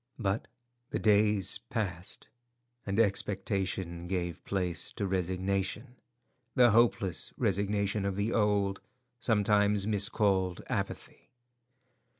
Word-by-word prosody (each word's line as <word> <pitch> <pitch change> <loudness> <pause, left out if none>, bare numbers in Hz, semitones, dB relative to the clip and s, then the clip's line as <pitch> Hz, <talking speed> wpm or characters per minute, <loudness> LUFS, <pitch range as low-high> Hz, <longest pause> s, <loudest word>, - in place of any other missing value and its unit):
But 100 -2 -1 0.4
the - - -2
days 105 -2 +3
passed, 95 -4 -4 0.6
and 100 +2 0
expectation 95 -4 -1
gave 85 -2 -3
place 90 -4 0
to 105 - -3
resignation—the 105 +7 -1
hopeless 110 -5 +2
resignation 100 0 0
of 100 -1 -1
the 105 +3 -1
old, 100 -2 +1 0.4
sometimes 105 -3 +2
miscalled, 100 -3 +2
apathy. - - -5
100 Hz, 90 wpm, -30 LUFS, 95-105 Hz, 0.6 s, days